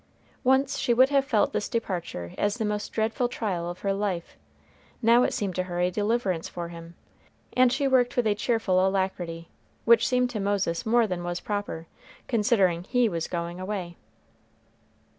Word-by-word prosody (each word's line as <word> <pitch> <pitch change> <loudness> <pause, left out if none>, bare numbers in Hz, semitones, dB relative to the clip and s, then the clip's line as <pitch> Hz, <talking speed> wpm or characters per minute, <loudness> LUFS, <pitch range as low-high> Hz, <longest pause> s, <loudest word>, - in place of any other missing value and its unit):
Once 265 +1 +2
she 240 - +2
would 260 +2 +6
have 280 -1 +3
felt 230 -6 +1
this 210 - -2
departure 175 - -4
as 205 +2 0
the 220 - -1
most 210 0 -3
dreadful 225 +2 0
trial 185 -8 -3
of 175 - -8
her 195 -1 0
life. 195 -4 -3 0.6
Now 235 +1 +5
it - - +2
seemed 195 -3 -2
to 185 - +1
her 175 -1 -4
a 180 +1 +2
deliverance 205 -4 -1
for 170 -1 -6
him, 170 0 -10 0.6
and 255 -1 +4
she 280 +2 +1
worked 255 -2 +2
with 245 - +2
a 215 - +3
cheerful 205 -3 +1
alacrity, 185 -3 -2 0.4
which 235 -1 +5
seemed 250 -1 +1
to 220 - -3
Moses 200 -3 -1
more 235 +1 +4
than 180 -4 -3
was 175 0 -3
proper, 205 -6 -4 0.4
considering 205 -7 +2
he 245 +1 +2
was 165 -3 -3
going 170 0 -4
away. 185 -3 -4
205 Hz, 175 wpm, -26 LUFS, 175-235 Hz, 0.6 s, would